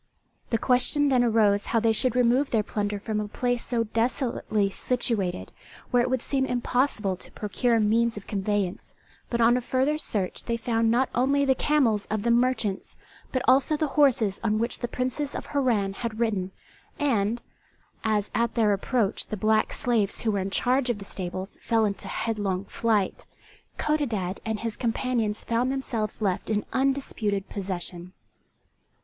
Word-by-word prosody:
The 230 - +2
question 260 +5 +2
then 255 -2 +4
arose 215 -3 +3
how 230 - +2
they 225 0 +3
should 250 +2 +1
remove 250 +3 +3
their 220 -3 +2
plunder 205 0 -2
from 215 +1 -2
a 210 - -2
place 245 +3 -1
so 235 -2 0
desolately 225 -3 0
situated, 215 -6 -1 0.4
where 245 -1 +4
it 245 - 0
would 255 -2 0
seem 270 -2 0
impossible 245 -5 0
to - - -12
procure 230 +3 +1
means 225 +2 +2
of 205 - -8
conveyance; 200 -2 -2 0.3
but 235 - -1
on 235 +1 +5
a 250 - 0
further 265 +5 0
search 200 -10 -3
they 235 -1 -1
found 230 0 +1
not 250 +3 +2
only 275 +3 +2
the 265 - +4
camels 255 -8 +2
of 215 -1 -2
the 235 - +2
merchants, 235 -5 0 0.3
but 255 - -1
also 275 +4 +4
the 305 -1 0
horses 240 -9 +3
on 215 -1 +1
which 230 +2 -2
the 240 - -2
Princes 255 +4 -3
of - - -4
Harran 235 -9 +1
had 225 +1 -5
ridden; 205 -6 0 0.5
and 235 -5 0 0.6
as, 210 -2 0
at 235 0 0
their 215 -3 +3
approach 205 +1 -1
the 215 - -4
black 215 +2 +2
slaves 225 -5 0
who 225 - +1
were 200 - 0
in 190 +1 -2
charge 250 +5 +2
of 240 - 0
the 200 - -9
stables 185 0 -5
fell 225 -2 +2
into 200 -1 -3
headlong 200 -4 -2
flight, 210 -3 0 0.5
Codadad 225 -12 -1
and 220 -1 -2
his 225 -2 -3
companions 230 -3 -1
found 240 +3 0
themselves 230 -6 -3
left 190 -1 -1
in 210 -1 0
undisputed 260 -7 0
possession. 180 -2 -5
230 Hz, 165 wpm, -26 LUFS, 205-250 Hz, 0.6 s, on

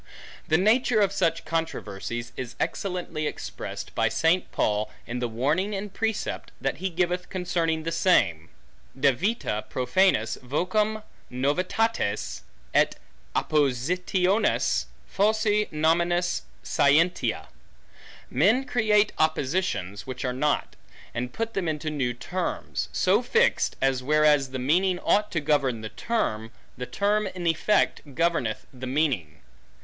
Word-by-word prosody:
The 160 - +4
nature 220 +4 +3
of 200 -2 +3
such 165 -4 0
controversies 120 -7 -4
is 125 -2 -6
excellently 175 -5 -2
expressed, - - -6
by - - +2
St. 170 +3 +1
Paul, 105 0 0 0.2
in 120 +1 -4
the 120 - -1
warning 150 - 0
and 195 0 -5
precept, 225 0 -2
that 135 0 -2
he 190 +4 -2
giveth 180 +1 -1
concerning 170 -4 -1
the 165 - -2
same, 90 - +2 0.5
Devita 140 - +1
profanas 125 - +2
vocum 210 - 0 0.3
novitates, 145 - -1 0.3
et - - +3 0.4
oppositiones 180 - +1 0.2
falsi 210 +1 +2
nominis 170 +3 +1 0.2
scientiae. 140 - +2 0.9
Men 215 - +3
create 215 -4 +2
oppositions, 145 - 0
which 130 0 -4
are 125 - -1
not; 150 +4 0 0.4
and 125 +1 -3
put 225 - -3
them 190 -5 -1
into 155 0 -2
new 130 -5 -1
terms, 180 +8 -3
so - - +3
fixed, - - +2
as 135 -1 +2
whereas 150 0 +3
the 130 - -4
meaning 175 +8 +2
ought 210 +1 +2
to 170 - 0
govern 140 -6 +1
the 110 - -5
term, 115 - -2 0.2
the 125 +1 -6
term 205 +1 +1
in 185 -2 -6
effect 170 +6 +2
governeth 165 -9 0
the 130 0 -7
meaning. 125 - -1
160 Hz, 125 wpm, -26 LUFS, 130-190 Hz, 0.9 s, The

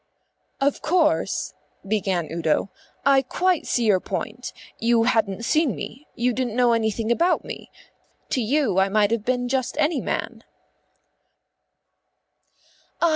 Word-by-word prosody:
"Of 280 0 +1
course," 325 -1 +1 0.3
began 195 -5 0
Udo, 165 +3 0 0.3
"I 275 -1 +5
quite 360 +6 0
see 240 - +1
your 200 -4 +4
point. 240 +6 -5 0.3
You 230 0 +3
hadn't 225 -3 +1
seen 310 -4 +2
me; 275 +6 -8
you 245 +1 +1
didn't 245 -2 -2
know 245 -1 +4
anything 225 0 0
about 345 +9 +2
me; - - -8 0.6
to 255 - +1
you 235 -4 +1
I 190 +1 +3
might 210 +1 +2
have 230 -2 0
been 245 +1 0
just 260 0 -1
any 300 0 +1
man." - - -3
240 Hz, 130 wpm, -23 LUFS, 215-275 Hz, 0.6 s, I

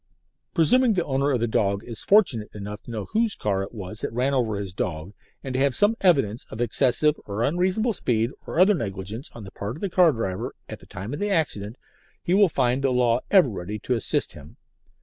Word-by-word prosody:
Presuming 235 +8 +5
the 180 -3 0
owner 140 +1 0
of 130 -4 +1
the - - +2
dog 100 -2 0
is 115 -2 -8
fortunate 140 - +3
enough 105 0 -7
to - - -15
know 110 -4 -4
whose 225 -1 +1
car 100 -2 -1
it 95 - -6
was 105 -1 -7
that - - -3
ran 125 +4 0
over 120 -5 +1
his 100 -3 -6
dog, 85 +1 -4 0.3
and 130 - -5
to 130 - 0
have 140 -1 +2
some 210 +2 +3
evidence 135 - +2
of 110 - -8
excessive 125 +5 +2
or 105 +3 -2
unreasonable 185 - +1
speed 115 - 0 0.2
or - - -2
other 190 +3 +6
negligence 100 - -5
on 115 - -10
the 95 - -10
part 100 +3 -5
of - - -13
the 200 - -2
car 175 -3 +5
driver 95 -7 -4
at - - -8
the - - -17
time 100 +5 -7
of - - -4
the 205 +1 -1
accident, 120 - -1 0.5
he 175 - 0
will 200 -1 +5
find 130 -2 +1
the 135 - +2
law 125 -2 +2
ever 190 -7 +6
ready 100 0 -5
to 125 - -2
assist 115 - -1
him. - - -13
125 Hz, 225 wpm, -24 LUFS, 105-170 Hz, 0.5 s, other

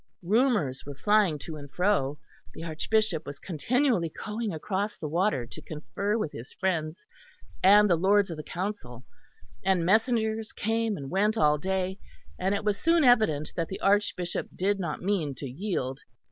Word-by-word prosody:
Rumours 205 - +2
were 145 0 -8
flying 205 -1 +3
to 155 +2 -8
and 145 -1 -10
fro; 180 -7 +1 0.4
the 160 - -7
Archbishop 165 +2 0
was 140 -1 -6
continually 195 - 0 0.2
going 215 0 -2
across 195 +5 -3
the 155 - -4
water 165 - +1
to - - -10
confer 200 +7 -3
with 160 -9 -2
his 115 +3 -9
friends 165 -4 -2 0.6
and 205 +2 +7
the 175 - +4
Lords 195 +2 +3
of 165 - -5
the - - -4
Council, 175 - -5 0.6
and 185 -3 +2
messengers 220 +1 +1
came 225 0 -1
and 135 -2 -7
went 210 +4 +2
all 150 -3 +3
day; 190 +2 -2 0.4
and 190 +2 +1
it 200 - -3
was 210 -1 0
soon 330 0 +3
evident 215 - +3
that 165 -2 -1
the 190 - -6
Archbishop 195 -3 +1
did 195 +2 0
not 170 -4 -4
mean 175 -8 0
to 140 - -7
yield. 135 -3 -3
190 Hz, 165 wpm, -28 LUFS, 155-210 Hz, 0.6 s, and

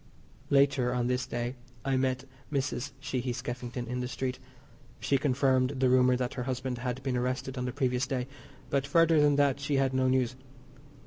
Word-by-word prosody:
Later 135 -3 +3
on 120 -1 0
this 125 0 0
day 120 0 -2 0.3
I 135 -1 +1
met 130 0 0 0.3
Mrs. 130 -3 -2
Sheehy 130 -2 -2
Skeffington 120 0 -5
in 125 +1 -3
the 125 - -2
street. 130 -1 -3 0.6
She 140 - +1
confirmed 130 -1 +2
the 130 -1 +3
rumour 125 0 +5
that 125 0 -2
her 125 - -3
husband 130 -1 -2
had 125 +1 -3
been 130 -1 -1
arrested 130 +2 -2
on 125 -1 -2
the 125 - -2
previous 125 -1 0
day, 130 -2 -1 0.5
but 140 0 +1
further 165 +1 +5
than 145 -1 +4
that 140 -1 +3
she 145 0 -1
had 135 -1 +2
no 130 0 +2
news. 130 -1 +1
130 Hz, 185 wpm, -30 LUFS, 125-135 Hz, 0.6 s, rumour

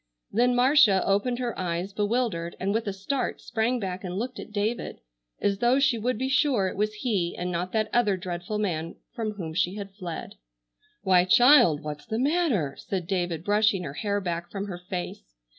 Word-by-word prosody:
Then 245 +3 +3
Marcia 245 -6 +5
opened 205 +5 +1
her 245 -3 -3
eyes 180 +2 -2
bewildered, 205 -5 -1
and 195 +2 0
with 225 0 -1
a - - 0
start, 200 +8 -2
sprang 235 +2 -1
back 190 -2 -4
and 180 0 -4
looked 245 +4 -4
at - - -9
David, 215 +3 -2 0.4
as 200 -1 0
though 240 +3 +3
she 275 -4 +2
would 245 +1 -1
be 260 +3 -1
sure 265 -7 +2
it - - -4
was 210 +2 0
he 195 -9 0
and 180 0 -3
not 180 +1 -2
that 220 -1 +1
other 215 -5 +3
dreadful 175 +3 -4
man 165 -6 -2 0.2
from 220 -3 -3
whom 170 -6 -6
she 180 +3 0
had 200 -2 -7
fled. 180 -5 -6 0.7
"Why, 185 -2 +5
child! 240 - +6
What's 150 -1 -6
the 220 - -2
matter?" 265 - +1
said 185 -3 -3
David, 175 -3 -2
brushing 205 -1 +2
her 140 - -5
hair 205 +6 -1
back 175 -2 -4
from 200 0 -4
her 185 -4 -6
face. 175 - -6
200 Hz, 190 wpm, -26 LUFS, 180-235 Hz, 0.7 s, child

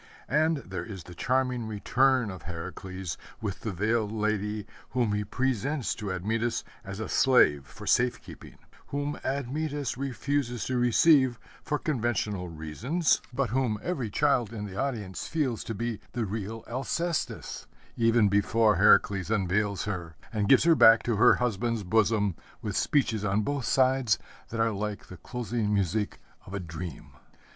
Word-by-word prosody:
And 160 +1 +2
there - - -5
is 95 -6 -8
the 90 - -11
charming 125 +3 0
return 125 +2 +2
of 95 -3 -9
Heracles 90 +2 -6 0.2
with 100 -3 -4
the 110 - -4
veiled 105 +3 0
lady 105 -1 -1 0.2
whom 120 -4 0
he 105 0 0
presents 130 +4 -1
to 105 -3 -5
Admetus 110 +6 -1 0.2
as 95 +1 -7
a 110 - -3
slave 75 - +4
for - - -11
safe 125 0 +2
keeping, - - -13 0.3
whom 145 +1 -3
Admetus 140 0 -2
refuses 135 -2 -2
to 130 -1 0
receive 130 +1 +4 0.2
for 150 - -1
conventional 110 - -1
reasons, 85 - 0
but 125 -3 -1
whom 125 -4 +1
every 135 -11 -2
child 125 -2 +2
in 105 -3 -5
the 95 -2 -8
audience 110 -7 -3
feels 140 -8 -1
to 115 - -4
be 115 0 -3
the 120 -2 -1
real 110 +2 -5
Alcestis, 160 +7 -3 0.3
even 115 -2 +4
before 105 +1 +3
Heracles 100 -1 +4
unveils 100 -1 0
her 85 -6 -4 0.2
and 105 -2 0
gives 135 - +7
her 170 0 +6
back 115 -7 +6
into 115 -3 +1
her 125 +3 +6
husband's 115 -2 -1
bosom 105 0 +2 0.3
with 105 -3 -4
speeches 115 -7 +1
on 105 +1 +1
both 140 0 -2
sides 130 -4 +3 0.3
that 115 - -4
are 115 0 +3
like 105 0 -4
the 90 - -9
closing 115 +3 -3
music 100 +1 0 0.3
of 95 - -6
a - - -2
dream. 85 -2 -7
110 Hz, 155 wpm, -28 LUFS, 100-130 Hz, 0.3 s, gives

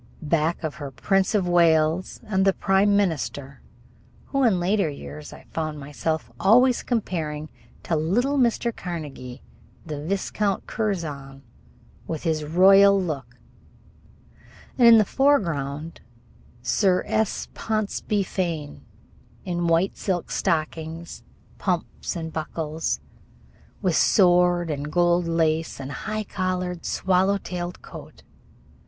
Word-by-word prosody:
Back 160 +3 0
of 155 -2 -2
her 145 - -4
the 130 - -21
Prince 195 +1 +2
of 190 -4 +1
Wales 165 0 +2
and 200 -4 0
the 195 0 +4
Prime 200 +2 +3
Minister, 145 -7 -2 0.7
who 275 - 0
in 215 -7 +3
later 190 0 +1
years 75 - -9
I - - -13
found 155 -2 -3
myself 145 -1 -3
always 245 +5 +5
comparing 160 -10 -3 0.3
to 165 - -1
little 240 - +1
Mr. 235 -1 +1
Carnegie, 145 -7 -7 0.4
the 150 -3 -5
Viscount 200 +2 -1
Curzon 150 -11 -4 0.6
with 160 -2 -4
his 160 -3 0
royal 195 +5 +6
look, 135 -9 -4 1.4
and 245 -2 +5
in 230 -1 +9
the 215 - +4
foreground 165 - 0 0.6
Sir 180 - +2
S. 220 -1 -1
Ponsonby 215 -1 -1
Fane, 170 -6 -4 0.6
in 175 -2 -1
white 165 +3 +2
silk 180 -4 -2
stockings, 160 +1 -2 0.4
pumps - - -2
and 160 -2 -5
buckles, 160 0 -3 0.8
with 180 -4 +2
sword 175 -3 +4
and 145 0 -4
gold 175 0 +2
lace, 165 -2 0
and 135 0 -6
high 215 +10 -4
collared 185 -3 -3
swallow 190 +2 +2
tailed 180 -2 -6
coat. - - -12
175 Hz, 120 wpm, -24 LUFS, 155-195 Hz, 1.4 s, in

